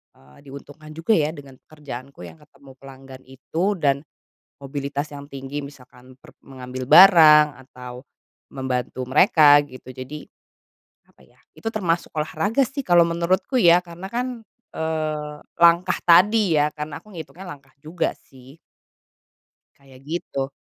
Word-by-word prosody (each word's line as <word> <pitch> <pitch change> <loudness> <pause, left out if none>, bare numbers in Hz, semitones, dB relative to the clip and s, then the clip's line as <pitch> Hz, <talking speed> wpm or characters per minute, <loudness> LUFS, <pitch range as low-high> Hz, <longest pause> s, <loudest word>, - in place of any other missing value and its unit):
eee, 70 +1 -22
diuntungkan 145 +2 -13
juga, 165 +8 0
ya, 155 -1 0
dengan 140 -4 -13
pekerjaanku 140 - -10
yang 80 - -14
ketemu 135 -1 -19
pelanggan 135 -1 -14
itu 160 +9 -3
dan, 140 -1 0 0.6
mobilitas 140 +1 -5
yang 140 -1 -10
tinggi 135 0 -7
misalkan 130 -3 -12
per - - -17
mengambil 130 -1 -8
barang 150 -3 +7
atau, 125 0 -11 0.5
membantu 130 -1 -4
mereka 145 -1 +5
gitu 130 -2 -13
jadi, 135 +4 -9 0.8
apa, - - -26
ya, - - -29 0.2
itu - - -15
termasuk 175 -6 -2
olahraga, 200 - -1
sih, 275 +2 -6
kalau 175 -6 +4
menurutku, 170 +8 -2
ya, 175 -4 +6
karena, 175 +1 -10
kan, 245 +2 -2 0.5
eee, 155 -2 -3 0.3
langkah 170 +1 +4
tadi, 190 +2 +4
ya, 150 +1 +1
karena 150 -1 -7
aku 215 -2 -17
ngitungnya 170 +3 -10
langkah 140 -1 -23
juga, 165 +2 -2
sih. 130 +3 -18 1.2
Kayak 135 -2 -19
gitu. 140 -4 -4
150 Hz, 135 wpm, -22 LUFS, 135-170 Hz, 1.2 s, barang